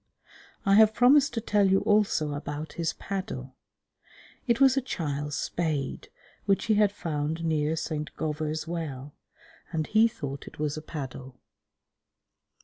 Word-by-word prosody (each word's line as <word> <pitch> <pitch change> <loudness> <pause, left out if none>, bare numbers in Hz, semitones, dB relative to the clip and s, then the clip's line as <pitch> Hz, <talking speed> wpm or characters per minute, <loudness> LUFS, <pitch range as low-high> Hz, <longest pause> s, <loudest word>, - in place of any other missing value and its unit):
I 195 - +4
have 220 0 +6
promised 260 +2 +5
to 230 - -1
tell 205 -3 +2
you 190 0 +4
also 205 -8 +2
about 145 +1 -5
his 165 -2 -1
paddle. 135 -10 -5 0.9
It 235 0 +2
was 270 -1 +6
a 270 - +2
child's 145 - -3
spade 155 -6 -2 0.4
which 195 +2 +2
he 225 - +3
had 210 -1 +4
found 160 -3 -3
near 155 -1 +1
St. 155 -2 -3
Govor's 155 0 -2
Well, 145 -5 -5 0.6
and 160 -3 -1
he 220 +5 +4
thought 140 -10 -6
it - - -11
was 150 -1 -1
a 155 - -5
paddle. 135 -4 -7
160 Hz, 145 wpm, -27 LUFS, 150-205 Hz, 0.9 s, have